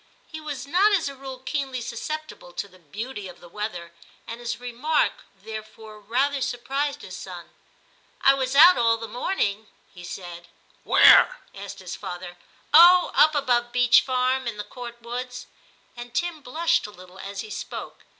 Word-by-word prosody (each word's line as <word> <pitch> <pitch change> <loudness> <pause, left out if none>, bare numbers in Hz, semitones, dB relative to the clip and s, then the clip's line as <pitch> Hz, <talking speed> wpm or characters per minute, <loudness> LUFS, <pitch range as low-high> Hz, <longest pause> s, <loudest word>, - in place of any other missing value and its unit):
He 315 -1 -9
was 290 -5 -6
not 370 +9 +3
as 355 -7 +2
a 280 - -6
rule 265 -1 -8
keenly 265 0 -3
susceptible 240 - -6
to 200 - -4
the 185 -1 -20
beauty 205 - -7
of 180 - -12
the 175 - -14
weather, 175 -3 -6 0.3
and 230 +1 -7
his 240 -1 -4
remark 245 +6 -1
therefore 215 +1 -10
rather 265 +7 0
surprised 275 +4 -2
his - - -8
son. - - -9 0.4
* - - -35
I 275 - +7
was 265 0 -2
out 340 +3 +8
all 230 -1 +3
the 225 0 -7
morning,' 220 - -2 0.3
he 180 -2 -12
said. 175 -1 -8 0.2
* - - -34
Where? - - +7
' - - -31
asked - - -8
his - - -7
father. 175 0 -7 0.2
* - - -34
Oh! 350 +3 +8
up 310 0 +5
above 245 -4 +1
Beech 245 -1 +5
Farm, 255 0 0
in 225 -3 -4
the 210 - -4
Court 235 +2 -9
woods,' 250 +1 -6 0.5
and 240 0 -10
Tim 345 -3 -2
blushed 310 -1 0
a - - -10
little 185 -1 -15
as 200 0 -6
he 215 - -10
spoke. - - -7
245 Hz, 180 wpm, -24 LUFS, 210-280 Hz, 0.5 s, out